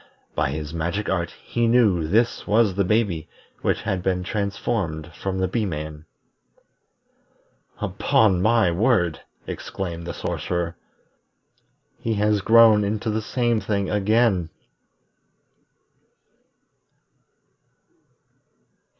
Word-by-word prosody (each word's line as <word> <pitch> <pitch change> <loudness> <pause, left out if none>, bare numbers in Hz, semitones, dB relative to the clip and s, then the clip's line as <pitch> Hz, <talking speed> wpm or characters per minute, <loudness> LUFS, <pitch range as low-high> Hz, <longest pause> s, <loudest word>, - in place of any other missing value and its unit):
By - - 0
his 75 +2 -5
magic 85 +5 -2
art 85 -3 0
he 120 -1 -2
knew 105 -9 +3
this 115 +7 +1
was 105 -2 +3
the 100 +2 +1
baby 95 -5 0 0.3
which - - 0
had 95 -2 -1
been 90 0 0
transformed 100 -5 -2
from 95 -1 -4
the 95 0 +1
Bee 110 +5 -1
man. 75 -2 -6 1.7
"Upon 95 -5 +2
my 110 -3 +3
word!" 90 -3 +1 0.3
exclaimed 85 -3 -5
the - - -4
Sorcerer, 85 -1 -3 1.2
"He 115 -1 -1
has 105 0 +2
grown 110 0 +6
into 105 +2 -1
the 110 +1 -1
same 120 0 0
thing 100 -1 -1
again!" 105 -4 +2
100 Hz, 100 wpm, -23 LUFS, 85-110 Hz, 1.7 s, grown